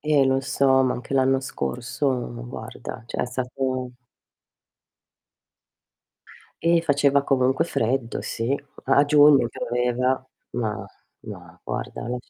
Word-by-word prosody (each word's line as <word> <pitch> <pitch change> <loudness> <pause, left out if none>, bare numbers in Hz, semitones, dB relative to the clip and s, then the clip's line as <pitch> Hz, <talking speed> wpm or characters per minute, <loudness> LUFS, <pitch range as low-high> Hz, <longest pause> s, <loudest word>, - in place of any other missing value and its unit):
Eh, 145 -3 +3
lo 135 0 +2
so, 135 -1 +3
ma 130 - +2
anche 125 +2 -5
l'anno 135 0 +3
scorso 125 - -3
guarda, 110 - -8
cioè, - - -3
è - - 0
stato 130 0 -3 2.7
Eh, 170 0 +3
faceva 140 -2 +3
comunque 130 +2 +2
freddo 120 -5 -1
sì. 120 +4 -2 0.3
A 145 - +4
giugno 145 -4 +6
pioveva, 125 +2 -1 0.3
ma 110 -3 -3 0.4
no - - -11
guarda - - -5
lascia 125 0 -5
130 Hz, 110 wpm, -24 LUFS, 125-140 Hz, 2.7 s, giugno